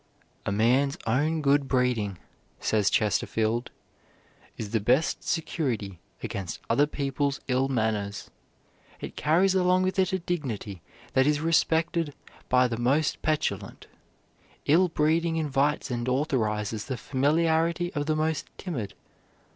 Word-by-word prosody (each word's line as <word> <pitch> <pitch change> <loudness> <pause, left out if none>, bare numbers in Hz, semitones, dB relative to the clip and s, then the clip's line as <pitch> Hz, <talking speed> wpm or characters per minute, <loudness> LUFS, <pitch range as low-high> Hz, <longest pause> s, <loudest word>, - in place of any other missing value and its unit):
"A - - +1
man's 130 +8 +2
own 150 +7 +1
good 140 0 +3
breeding," 125 -7 0 0.4
says 105 -3 +2
Chesterfield, 110 +2 0 0.9
"is 105 -2 -5
the 115 - +2
best 125 +9 +1
security 120 - -2 0.2
against 95 -3 -4
other 145 +5 +4
people's 140 -1 -1
ill 130 +1 +2
manners. 110 -5 -2 0.7
It - - -7
carries 175 +5 +3
along 185 0 +3
with 190 +1 0
it 185 - +2
a 190 - +1
dignity 125 - -4 0.3
that 130 +1 +4
is 150 -1 +2
respected 165 -1 +1 0.3
by 125 0 +4
the 115 -2 -3
most 140 +6 +1
petulant. 125 -11 -2 0.8
Ill 175 +5 +5
breeding 165 +1 +1
invites 145 -2 0
and 120 +1 -2
authorizes 110 -6 -1
the 130 - -4
familiarity 160 - +1
of 145 0 -2
the 155 - +2
most 155 0 -1
timid. 115 - -5
140 Hz, 125 wpm, -27 LUFS, 115-160 Hz, 0.9 s, Ill